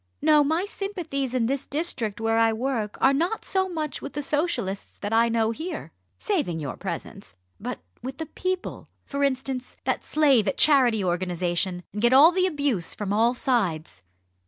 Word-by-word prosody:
No! 300 -1 +5
my 320 +6 0
sympathies 345 - -4
in 240 -3 +2
this 270 +3 -1
district 265 -9 -2
where 225 0 +1
I 225 0 +4
work 225 -3 -2
are 270 - +4
not 340 +10 -1
so 380 -1 0
much 310 -4 -4
with 280 - -7
the 295 - -3
Socialists 265 - -2
that 205 +2 -4
I 230 +1 +4
know 225 -1 +1
here 320 +10 -6 0.3
saving 295 - -1
your 140 -4 -4
presence! - - -7 0.2
but - - -4 0.2
with 260 +2 -6
the 320 - -4
people, 370 +4 -4 0.2
for 280 0 -2
instance, 260 -2 -2
that - - -1
slave 275 -9 +3
at 190 - 0
Charity 250 -8 +5
Organisation! 180 0 -1
and 210 - -4
get 240 +2 +4
all 295 +6 +8
the 370 +1 +2
abuse 285 - -1
from 205 -1 -3
all 230 +4 +3
sides." 180 - -1
255 Hz, 175 wpm, -25 LUFS, 215-305 Hz, 0.3 s, all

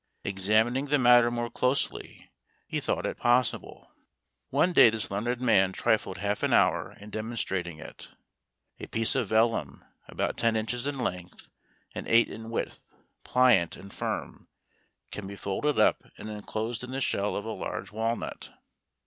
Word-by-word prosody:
Examining 110 +7 +1
the 145 +1 +2
matter 120 -2 +6
more 120 0 -3
closely, 130 +2 -2 0.3
he - - -2
thought - - -2
it - - -3
possible. 120 0 0 0.6
One 180 - +2
day 120 - +8
this 110 -3 -3
learned 120 +5 -2
man 95 -7 +3
trifled 110 -4 0
half 100 +1 -2
an - - +1
hour - - +2
in 105 +1 -11
demonstrating 100 -7 -3
it. 80 - -11 0.7
A - - -7
piece 115 0 0
of 125 -5 0
vellum, 110 -9 0 0.2
about - - -2
ten 115 -1 +2
inches 120 +4 -2
in 145 -1 -3
length 90 -7 -5 0.4
and - - -6
eight 115 0 +5
in 115 0 -8
width, 115 - -5 0.3
pliant 125 -9 +3
and 100 0 -12
firm, - - -5 0.6
can 105 -2 -6
be 100 - -7
folded 100 +10 -1
up, - - +4 0.2
and 110 - -7
enclosed 110 +3 -4
in 125 - -7
the 130 +1 -3
shell 105 -6 0
of 100 - -4
a 110 - -4
large - - -5
walnut. 115 +2 -3
115 Hz, 155 wpm, -28 LUFS, 100-120 Hz, 0.7 s, day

